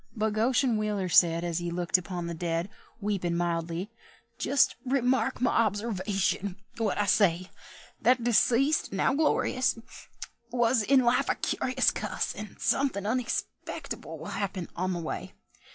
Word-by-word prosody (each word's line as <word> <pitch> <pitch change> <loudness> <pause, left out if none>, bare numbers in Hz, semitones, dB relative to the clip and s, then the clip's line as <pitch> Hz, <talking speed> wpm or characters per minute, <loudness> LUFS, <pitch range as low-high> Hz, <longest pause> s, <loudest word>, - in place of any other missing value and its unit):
But 215 -1 0
Goshen 240 +2 +2
Wheeler 210 -3 -1
said, 170 0 +5
As 170 -1 -1
he 175 0 -3
looked 175 0 -1
upon 180 -1 0
the 170 - -4
dead, 170 +3 -2 0.3
Weepin' 195 -5 -1
mildly, 170 +3 -2 0.5
"Just 275 -2 +3
remark 260 -1 +1
my 245 -1 +2
observation 200 -3 0 0.2
what 225 -3 0
I 205 - +1
say: 185 -2 +2 0.5
That 250 -1 +3
deceased, 245 +5 +3
now 195 +7 +1
glori_ous_, 260 -4 +1 0.7
Was 240 0 +2
in 260 +5 +4
life 240 0 +2
a - - +2
curious 255 0 +1
cuss, 210 -3 -3
And 210 0 -9
somethin' 265 -8 0
unexpectable 235 +2 -4
will - - -9
happen 190 -3 -4
on 185 +1 -1
the 175 - -3
way. 160 - -5
210 Hz, 140 wpm, -28 LUFS, 180-245 Hz, 0.7 s, said